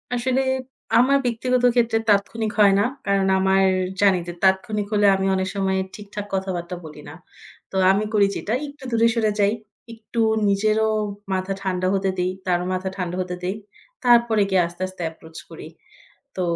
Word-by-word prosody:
আসলে 255 Hz, +2 st, 0 dB, 0.6 s
আমার 270 Hz, +4 st, +5 dB
ব্যক্তিগত 250 Hz, +1 st, 0 dB
ক্ষেত্রে 230 Hz, -2 st, +2 dB
তাৎক্ষণিক 210 Hz, +2 st, +1 dB
হয় 200 Hz, -2 st, +6 dB
না। -, -, +3 dB, 0.2 s
কারণ 195 Hz, -1 st, +2 dB
আমার 190 Hz, 0 st, +3 dB, 0.4 s
জানি 195 Hz, -3 st, +4 dB
যে 175 Hz, -, -5 dB
তাৎক্ষণিক 200 Hz, +2 st, +1 dB
হলে 205 Hz, 0 st, +3 dB
আমি 190 Hz, 0 st, -1 dB
অনেক 190 Hz, 0 st, -1 dB
সময় 190 Hz, -1 st, 0 dB, 0.2 s
ঠিকঠাক 205 Hz, 0 st, -7 dB
কথাবার্তা 185 Hz, -2 st, -3 dB
বলি 150 Hz, -1 st, -11 dB
না। -, -, -10 dB, 0.6 s
তো -, -, -9 dB, 0.2 s
আমি 200 Hz, +2 st, +1 dB
করি 205 Hz, -2 st, +4 dB
যেটা 215 Hz, -, -3 dB
একটু 285 Hz, 0 st, -13 dB
দূরে 230 Hz, 0 st, +3 dB
সরে 220 Hz, -2 st, +1 dB
যাই, 200 Hz, +1 st, +3 dB, 0.4 s
একটু 225 Hz, +1 st, -7 dB, 0.3 s
নিজেরও 215 Hz, +2 st, +2 dB, 0.4 s
মাথা 190 Hz, +1 st, -2 dB
ঠান্ডা 185 Hz, -1 st, -1 dB
হতে 195 Hz, 0 st, 0 dB
দেই, 180 Hz, +1 st, 0 dB
তারও 180 Hz, -1 st, 0 dB
মাথা 185 Hz, +1 st, -2 dB
ঠান্ডা 180 Hz, -2 st, -3 dB
হতে 180 Hz, -1 st, -4 dB
দেই 185 Hz, +3 st, -2 dB, 0.5 s
তারপরে 235 Hz, -3 st, +4 dB
গিয়ে 190 Hz, -2 st, +3 dB
আস্তে, 175 Hz, +2 st, -13 dB
আস্তে 185 Hz, -1 st, -11 dB
approach 160 Hz, 0 st, -13 dB
করি। -, -, -10 dB, 0.7 s
তো 185 Hz, -, -3 dB
200 Hz, 165 wpm, -22 LUFS, 185-220 Hz, 0.7 s, হয়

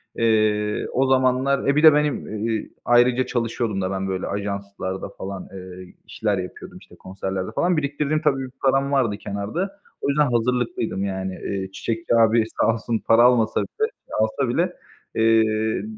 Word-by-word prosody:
Eee, 110 Hz, -2 st, +1 dB
o 135 Hz, +1 st, +2 dB
zamanlar 130 Hz, +1 st, +2 dB
e, 140 Hz, -, +3 dB
bir 150 Hz, -, +2 dB
de 155 Hz, -2 st, +9 dB
benim, 145 Hz, -7 st, -1 dB
eee, 110 Hz, -2 st, -2 dB, 0.2 s
ayrıca 120 Hz, +1 st, +4 dB
çalışıyordum 115 Hz, -4 st, -2 dB
da 95 Hz, -, -2 dB
ben, 95 Hz, 0 st, -2 dB
böyle, 95 Hz, -1 st, -3 dB
ajanslarda 100 Hz, -1 st, -4 dB
falan, 95 Hz, 0 st, -6 dB
eee, 90 Hz, -1 st, -10 dB
işler 105 Hz, -3 st, -1 dB
yapıyordum, 90 Hz, 0 st, -7 dB
işte -, -, -17 dB
konserlerde 95 Hz, +1 st, -5 dB
falan. 175 Hz, -1 st, +2 dB
Biriktirdiğim 150 Hz, +1 st, -1 dB
tabii, 140 Hz, -4 st, +1 dB
bir 125 Hz, -, -11 dB
param 135 Hz, +1 st, +2 dB
vardı 120 Hz, -7 st, +1 dB
kenarda. 165 Hz, -, -4 dB, 0.2 s
O -, -, 0 dB
yüzden 145 Hz, -2 st, +2 dB
hazırlıklıydım 120 Hz, -4 st, 0 dB
yani. 95 Hz, -1 st, -3 dB
Eee, 95 Hz, -1 st, -3 dB
çiçekçi 115 Hz, +4 st, -2 dB
abi 115 Hz, 0 st, +4 dB, 0.2 s
sağ 115 Hz, -, +4 dB
olsun 115 Hz, 0 st, -2 dB
para 115 Hz, +1 st, +6 dB
almasa 120 Hz, -3 st, +3 dB
bile -, -, -5 dB
eee, 440 Hz, +2 st, -3 dB
alsa 110 Hz, +4 st, 0 dB
bile, 175 Hz, +8 st, 0 dB, 0.4 s
eee, 110 Hz, -1 st, +2 dB
115 Hz, 160 wpm, -23 LUFS, 100-135 Hz, 0.4 s, de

